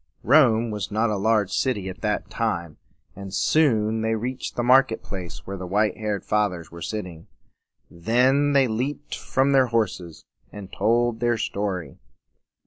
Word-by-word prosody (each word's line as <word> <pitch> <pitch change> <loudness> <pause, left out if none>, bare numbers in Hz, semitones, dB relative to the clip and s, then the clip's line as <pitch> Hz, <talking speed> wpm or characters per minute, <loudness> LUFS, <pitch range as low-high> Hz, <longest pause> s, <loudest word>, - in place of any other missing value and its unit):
Rome 120 -4 +4
was 105 -2 -4
not 110 +1 0
a - - 0
large 105 0 +1
city 105 -8 -1
at 95 0 -8
that 105 -1 -1
time; 85 -9 -2 0.4
and 100 0 -8
soon 110 0 +2
they 110 0 0
reached 125 +3 -4
the 120 - -1
market 125 -1 +4
place 85 -8 -8
where 100 0 -6
the 90 -1 -6
white 105 +3 +1
haired 105 -3 -3
Fathers 100 -6 -1
were 85 0 -10
sitting. 90 -3 -6 0.6
Then 130 +10 +2
they 135 -2 +4
leaped 130 +6 -3
from 135 +1 0
their 135 -2 +4
horses, 95 -8 -2 0.3
and 100 -2 -10
told 115 +2 +1
their 120 0 +1
story. 100 -5 -4
110 Hz, 155 wpm, -24 LUFS, 95-120 Hz, 0.6 s, Rome